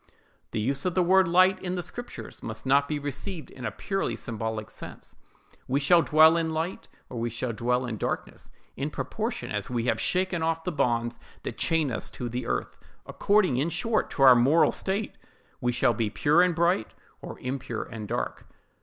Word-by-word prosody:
The - - -3
use 135 +6 -1
of 180 -2 -1
the 185 - +4
word 190 +1 +5
light, 185 +2 +4
in 180 0 -3
the 175 - -3
Scriptures, 240 +8 -8
must 110 +3 -7
not 140 +1 +4
be 150 - -1
received 145 +5 -5
in 125 - -8
a - - -1
purely 195 -1 -2
symbolical 110 -1 -4
sense. - - -9 0.5
We 135 +2 +1
shall 170 +4 +5
dwell 160 +1 +6
in 165 -1 0
light, 165 +4 -3 0.2
or 120 - -6
we 120 +1 -1
shall 120 +1 -3
dwell 125 +3 0
in 115 -3 -4
darkness, - - -4 0.3
in - - -2
proportion - - -4
as 105 -1 -3
we 120 -2 -1
have - - +1
shaken 185 -2 0
off 165 0 0
the 180 - -2
bonds 120 -5 0 0.2
that - - -6
chain 160 -5 +1
us - - -3
to 120 - -3
the 125 +2 -4
earth; - - -2 0.3
according, 200 -10 +2
in 145 +6 +1
short, 225 +5 0
to 135 - 0
our 130 -1 +10
moral 130 +7 +4
state, 200 +2 -2 0.4
we 125 - +1
shall 120 0 +2
be 110 -1 -1
pure 150 +10 +3
and 180 -2 +3
bright, 170 -8 +1 0.3
or - - -8
impure 125 -3 -4
and 110 -2 -8
dark. - - -3
145 Hz, 195 wpm, -27 LUFS, 120-175 Hz, 0.5 s, our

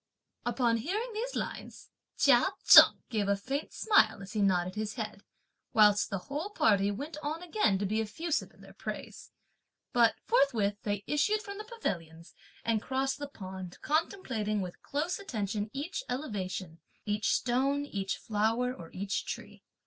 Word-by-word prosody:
Upon 240 -1 +2
hearing 420 - -3
these 480 +4 -3
lines, - - -6 0.3
Chia - - +5 0.2
Cheng - - +9
gave 215 -4 0
a 200 - +3
faint 270 +9 -4
smile, 410 - +3
as 195 - -10
he 215 - 0
nodded 185 -2 +2
his 215 0 -3
head, 215 -4 -5 0.5
whilst 210 -2 +5
the 195 - -1
whole 285 - -5
party 205 - +3
went 285 +10 -5
on 310 +3 -3
again 350 - +2
to 200 - -2
be 215 +3 0
effusive 315 +9 -2
in - - -21
their - - -14
praise. - - -7 0.6
But 235 -2 +5
forthwith 230 - +2
they 205 -1 -2
issued 420 +9 +1
from 400 0 -7
the 425 - -6
pavilions, 170 - -5 0.3
and 225 -2 +1
crossed 270 +3 -1
the 290 - -4
pond, 190 -7 -8
contemplating 265 - 0
with 180 -2 -6
close 310 +7 -2
attention 215 - -3
each 295 - -4
elevation, 190 - -4 0.3
each 210 -1 0
stone, 275 +4 +1
each 195 -8 -3
flower, 225 +4 0
or 170 -8 -10
each 195 +1 -2
tree. - - -7
225 Hz, 155 wpm, -31 LUFS, 200-295 Hz, 0.6 s, Cheng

